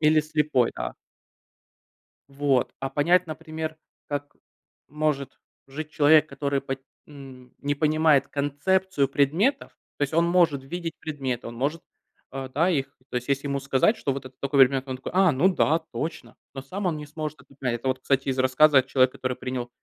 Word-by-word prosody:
Или 155 0 +5
слепой, 150 -5 +1
да. - - -3 1.4
Вот, 140 -2 +1
а 135 - -3
понять, 170 +6 +3
например, 155 0 -6 0.3
как 145 0 -5 0.5
может 150 -2 -2 0.3
жить 150 +3 -7
человек, 150 +1 +5
который 140 -1 -1
по 135 0 -3 0.3
м, 135 -4 -13
не 145 0 -1
понимает 155 -2 +3
концепцию 145 +3 0
предметов. 165 - +1 0.3
То - - -11
есть 140 - -3
он 165 +1 +4
может 170 -6 +3
видеть 165 +3 -5
предметы, 135 -6 -4
он 115 - -8
может, 145 +7 -2 0.5
э, 135 -1 -5
да, 160 +7 +2
их 140 -5 -2
То - - -7
есть, 125 - -6
если 140 +1 0
ему 140 0 -1
сказать, 140 - +2
что 140 - -2
вот 135 0 -5
это 130 0 -12
такой 140 0 0
предмет, 135 +1 +4
он 130 -1 -4
такой: 130 - -7
"А, 190 -3 +5
ну 145 +8 +3
да, 160 0 +3
точно!". 160 - -5 0.2
Но 135 - -4
сам 195 +7 -5
он 160 -3 -1
не 150 - -7
сможет 155 0 -6
это 140 - -22
понять. 125 -3 -1
Это 130 - -4
вот, 130 0 -1
кстати, 135 +1 0
из 130 - -1
рассказа, 135 +2 +5
а, - - +1
"Человека, 130 -1 +2
который 130 -1 -3
принял 125 -1 -4
145 Hz, 185 wpm, -25 LUFS, 135-155 Hz, 1.4 s, Или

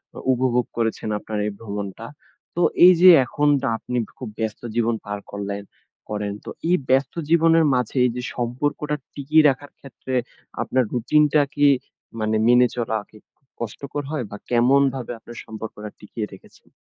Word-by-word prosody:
অ - - -7
উপভোগ 125 -1 +1
করেছেন 115 -1 -1
আপনার 110 +1 -5
এই - - -2
ভ্রমণটা। 100 -1 -6 0.5
তো, 175 - 0 0.2
এইযে 180 0 +8 0.2
এখনটা 145 +2 +1
আপনি 125 +2 -4 0.2
খুব 130 - -6
ব্যস্ত 110 -1 -3
জীবন 115 -1 +1
পার 105 0 -4
করলেন 100 0 -4 0.5
করেন, 105 -1 -3
তো - - -6 0.2
এই 180 - +5
ব্যস্ত 135 0 +2 0.2
জীবনের 165 -1 +5
মাঝে 125 -1 -1
এইযে 125 0 -1
সম্পর্কটা 145 +5 -2 0.2
টিকিয়ে 150 +2 +4
রাখার 140 +1 -4
ক্ষেত্রে 130 -1 -8 0.5
আপনার 130 0 +1
রুটিনটা 150 +5 +3
কি 145 -1 +4 0.5
মানে 110 0 0
মেনে 125 +1 +6
চলা 115 -2 -1
কি 110 - -17 0.4
কষ্টকর 140 +6 -5
হয়? 150 -5 -2
বা, 105 - -7
কেমনভাবে 130 +1 +2
আপনার 120 +1 -12
সম্পর্কটা 110 -1 -7
টিকিয়ে 105 +1 -5
রেখেছেন? 95 - -17
125 Hz, 145 wpm, -22 LUFS, 110-145 Hz, 0.5 s, এইযে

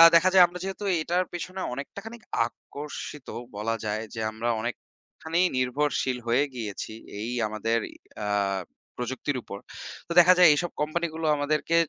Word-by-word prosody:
দেখা 175 +3 +7
যায় 185 -1 +9
আমরা 175 +1 -8
যেহেতু 195 +2 -4 0.2
এটার 175 +3 +1
পেছনে 185 +2 -4
অনেকটা 140 +8 -6
খানিক 225 0 -9 0.2
আকর্ষিত 145 +2 -8 0.3
বলা 110 +2 -1
যায় 105 +1 -1
যে - - -4
আমরা 110 +2 -2
অনেকখানি 160 +7 -5 0.2
নির্ভরশীল 130 0 +1
হয়ে 120 +4 +4
গিয়েছি 110 -2 -5 0.3
এই 110 +3 -3 0.2
আমাদের 110 +2 0 0.5
আ - - -2 0.8
প্রযুক্তির 130 +3 -2
উপর। 100 - -7 0.5
তো - - -9
দেখা 175 +1 +9
যায় 180 -2 +9
এইসব 175 +4 -1
কোম্পানিগুলো 160 +1 -1
আমাদেরকে 150 +3 0
145 Hz, 140 wpm, -27 LUFS, 120-170 Hz, 0.8 s, যায়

